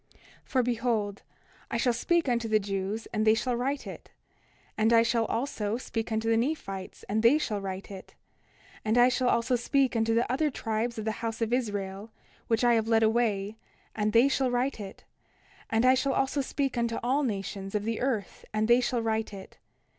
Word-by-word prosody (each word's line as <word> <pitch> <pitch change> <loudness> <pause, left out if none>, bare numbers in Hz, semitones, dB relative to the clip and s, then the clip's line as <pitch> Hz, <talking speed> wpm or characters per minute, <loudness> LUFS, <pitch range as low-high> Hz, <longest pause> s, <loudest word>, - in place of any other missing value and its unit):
29:12 - - -27 0.3
For 255 -2 +1
behold, 230 -4 -1 0.5
I - - -1
shall 245 - +2
speak 335 +7 +1
unto 235 -2 0
the 215 -1 +3
Jews 195 +2 -3
and 215 -1 +1
they 220 0 +5
shall 245 +2 -1
write 270 +4 -2
it; - - -9 0.7
and 220 +1 +2
I 230 -1 +6
shall 230 -1 +1
also 230 -4 -2
speak 225 -2 -4
unto 220 0 -1
the 225 0 +3
Nephites 225 -8 -3
and 215 +2 0
they 235 +6 +6
shall 215 -9 -2
write 195 0 -6
it; 190 -1 -10 0.7
and 220 +2 +1
I 245 +1 +7
shall 250 0 +1
also 235 +2 +2
speak 265 +1 +1
unto 225 0 +2
the 235 - +3
other 300 +4 +1
tribes 230 -2 -2
of 215 - -4
the 220 - +1
house 225 -1 -3
of 230 0 -1
Israel, 205 -4 -2 0.4
which 225 +1 +1
I 240 -1 +5
have 225 -1 +1
led 225 -1 +3
away, 220 -2 +1 0.4
and 215 0 0
they 235 +4 +5
shall 265 -2 +1
write 245 +1 -1
it; 195 -2 -9 0.7
and 225 +2 +2
I 255 - +7
shall 270 +1 +1
also 270 +1 0
speak 270 -2 -2
unto 235 -1 -1
all 265 +4 +2
nations 195 -4 -3
of 205 - 0
the 225 +1 -2
earth 240 -6 -2
and 215 0 0
they 240 +2 +5
shall 245 -1 -1
write 220 -1 -1
it. 190 - -12
230 Hz, 200 wpm, -28 LUFS, 215-250 Hz, 0.7 s, I